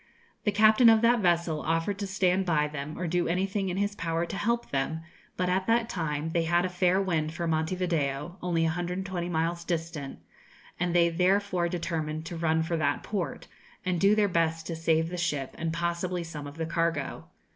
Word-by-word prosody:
The 210 - +3
captain 215 +3 +6
of 225 -1 +5
that 235 +1 +5
vessel 170 -4 +1
offered 165 +5 -1
to 200 - -2
stand 190 0 +2
by 155 -5 +2
them 150 0 -6
or 180 - -3
do 175 +1 0
anything 190 +2 0
in 180 - -3
his 205 +1 0
power 165 -3 -1
to - - -6
help 235 +4 -1
them; 145 +4 -1 0.4
but 180 - 0
at 185 +1 0
that 230 0 +2
time 160 -2 -2
they 170 - +1
had 175 +2 +2
a - - -1
fair 180 +1 +2
wind 165 -5 -1
for 170 - -2
Monte 160 +2 0
Video, 165 -3 -1
only 170 -2 +1
120 175 +2 -2
miles 170 +1 -1
distant, 165 -5 -4 0.6
and 175 0 0
they 170 -1 +5
therefore 180 0 +1
determined 160 -3 -3
to 170 - -6
run 160 -1 +1
for 165 +1 -1
that 145 -2 0
port, 200 -5 -3 0.4
and 180 -2 0
do 200 +2 +5
their 210 -1 +3
best 165 -3 0
to 165 - -4
save 160 0 +1
the 180 - -5
ship, 150 -6 -2
and 165 0 -1
possibly 170 +1 -2
some 150 -3 -7
of 145 +2 -10
the 165 - -2
cargo. 165 -3 -1
170 Hz, 200 wpm, -28 LUFS, 160-185 Hz, 0.6 s, captain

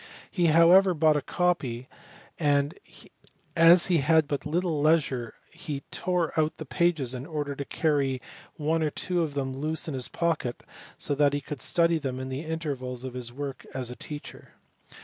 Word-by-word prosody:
He 175 -4 +2
however 175 +4 +6
bought 155 0 +4
a 150 - +1
copy, 130 -9 -1 0.5
and 145 -1 +2 0.8
as 170 +1 +7
he 180 -3 +3
had 160 +2 +3
but 145 0 -3
little 165 -1 0
leisure 145 -7 +1 0.2
he 155 -4 -6
tore 180 -3 -1
out 155 0 0
the 155 - -7
pages 140 -1 +1
in 130 +3 -6
order 150 -3 -3
to 140 - -4
carry 140 -5 0 0.4
one 160 +1 0
or 155 - +1
two 175 +3 -2
of 155 -3 -2
them 135 -2 -2
loose 155 +5 -3
in 155 - -3
his 130 -2 -2
pocket 160 -8 -2 0.3
so - - -1
that 145 0 +3
he 145 - 0
could 145 -1 -7
study 170 -1 +2
them 130 -3 -4
in 130 0 -5
the 130 +2 -4
intervals 140 -6 -4
of 130 -2 -6
his 125 -2 -5
work 140 +1 -6
as 125 -2 -3
a - - -7
teacher. 150 +2 -9
150 Hz, 180 wpm, -27 LUFS, 135-165 Hz, 0.8 s, as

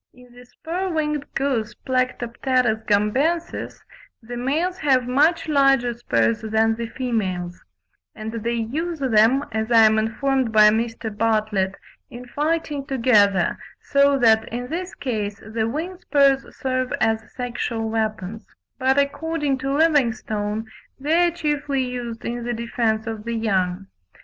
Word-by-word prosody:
In 250 -1 -18
the 245 0 -14
spur 355 +8 -4
winged 300 -3 -2
goose, 255 -6 -1
Plectropterus 255 -2 0
gambensis, 270 +12 0 0.4
the 240 +2 -7
males 315 +10 -1
have 260 -6 +2
much 310 +7 +2
larger 275 -5 +3
spurs 115 - 0
than 220 +1 +2
the 230 +1 -4
females; 190 -8 -3 0.5
and 215 0 -6
they 230 +1 -2
use 305 +10 -3
them, 255 +1 +3
as 220 +1 -2
I 225 -1 +7
am 220 0 +4
informed 255 +3 0
by 215 -1 +7
Mr. 225 -1 -2
Bartlett, 210 -3 0 0.3
in 245 0 -9
fighting 295 +1 -2
together, 210 - +3 0.2
so 280 0 +3
that, 220 -3 +4
in 245 +2 -4
this 360 +3 -4
case, 210 -6 -3
the 220 +1 -2
wing 340 +8 -4
spurs 275 -5 +3
serve 255 -1 -1
as 220 0 +1
sexual 240 -2 -3
weapons; 220 -2 -3 0.3
but 265 +1 +2
according 285 0 0
to 270 +1 -2
Livingstone, 230 -8 +1 0.3
they 325 +5 +3
are - - 0
chiefly 295 -4 -1
used 245 -2 -5
in 240 0 -3
the 240 0 -2
defence 230 -1 -1
of 220 -2 -5
the 235 +1 -3
young. 195 -4 0
240 Hz, 140 wpm, -22 LUFS, 220-280 Hz, 0.5 s, I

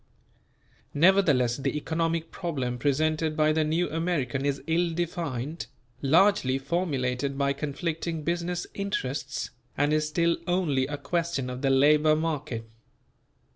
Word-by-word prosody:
Nevertheless 150 -8 +4
the 140 - -2
economic 165 +1 -1
problem 130 -9 -3
presented 155 +3 +1
by 155 0 +4
the 160 0 +2
New 160 +3 +1
American 145 -5 -1
is 140 -1 -2
ill 165 0 +1
defined, 160 -4 -3 0.3
largely 155 -2 +4
formulated 135 -3 -1
by 140 0 +1
conflicting 160 +3 -3
business 175 +2 -2
interests, 140 -9 -3 0.3
and 145 +1 +2
is 155 0 +1
still 170 +2 +1
only 160 -8 +1
a 145 0 -4
question 165 -4 -2
of 125 0 -6
the 135 - +2
labour 150 +3 +5
market. 150 -7 -3
155 Hz, 125 wpm, -27 LUFS, 135-170 Hz, 0.3 s, labour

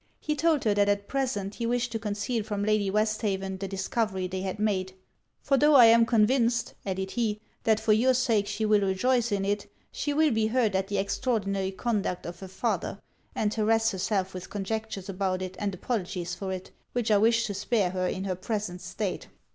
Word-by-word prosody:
He 300 - -2
told 310 -1 +2
her 215 - +3
that 205 0 +3
at 200 0 0
present 245 -8 -2
he 230 +1 -3
wished 245 0 0
to 225 - -2
conceal 210 +2 -2
from 205 -1 -3
Lady 210 -1 +2
Westhaven 200 -2 -1
the 195 - -3
discovery 195 0 -1
they 185 +1 -4
had 190 +1 -3
made. 190 -3 -1 0.5
'For 275 - +3
tho' 295 +2 +5
I 250 -4 +10
am 230 0 +6
convinced,' 235 +1 +2
added 190 0 -2
he, 220 -3 -1 0.3
'that 220 -1 +4
for 215 - +3
your 255 +4 +4
sake 225 -5 +2
she 220 - -2
will 210 -1 +4
rejoice 235 +5 +1
in 195 -1 0
it, 205 0 -2 0.2
she 290 - -2
will 305 +1 +3
be 220 -1 +2
hurt 225 -2 +1
at 190 0 0
the 200 0 -2
extraordinary 200 -2 -1
conduct 195 -2 -2
of 175 0 -7
her 190 - -8
father, 195 0 -2 0.4
and 210 -1 0
harrass 225 +1 +2
herself 190 0 -1
with 185 -1 -7
conjectures 205 -1 -4
about 185 -1 -1
it 185 0 -6
and 200 -2 -2
apologies 180 -4 -3
for 190 +1 -4
it, 185 -1 -6 0.2
which 240 -2 0
I 205 - +5
wish 230 +2 +3
to 205 - -3
spare 200 -1 0
her 185 -1 -1
in 190 - -3
her 190 -1 -1
present 185 -1 -4
state.' - - -4
210 Hz, 205 wpm, -28 LUFS, 190-230 Hz, 0.5 s, I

